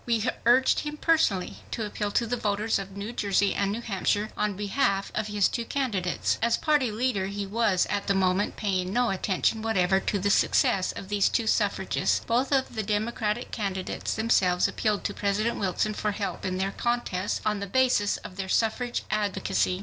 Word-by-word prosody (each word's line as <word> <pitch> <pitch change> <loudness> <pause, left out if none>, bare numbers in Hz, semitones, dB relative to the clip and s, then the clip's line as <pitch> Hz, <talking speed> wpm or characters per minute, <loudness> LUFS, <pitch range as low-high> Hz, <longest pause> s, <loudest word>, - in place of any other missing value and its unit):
We 230 0 +1 0.2
urged 255 +2 +5
him 300 0 -5
personally 305 - +1
to 225 - -3
appeal 210 0 -3
to 235 - +2
the 240 +2 -1
voters 210 -1 0
of 195 0 -8
New 205 +4 -5
Jersey 200 -2 +1
and 200 0 0
New 225 +3 -3
Hampshire 205 0 -1
on 210 -1 -1
behalf 200 0 0
of 215 - -2
his 205 -2 +2
two 235 - -3
candidates. 220 -9 -1
As 235 +1 +2
Party 295 -7 +2
leader 215 -4 0
he 200 +1 -4
was 205 -2 +1
at 205 -1 -2
the 195 - +2
moment 190 +1 +1
paying 185 -3 -1
no 245 -1 +2
attention 195 +3 0
whatever 190 -4 +2
to 200 - -1
the 200 +1 +1
success 190 -1 +3
of 190 - -9
these 205 -1 +2
two 230 - 0
suffragists. 215 - +1
Both 250 +4 +1
of 265 -2 +1
the 220 - -2
Democratic 215 +2 -2
candidates 195 -3 -3
themselves 190 -5 +2
appealed 210 -2 -1
to 205 - -2
President 210 +4 -1
Wilson 200 +2 0
for 210 0 -2
help 200 -1 -4
in 185 -1 -1
their 190 +1 -1
contests, 210 -5 -1
on 210 -1 +1
the 200 - -4
basis 245 -2 +2
of 185 - -11
their 190 -1 -4
suffrage 240 +3 0
advocacy. 200 -3 0
210 Hz, 190 wpm, -27 LUFS, 195-230 Hz, 0.2 s, urged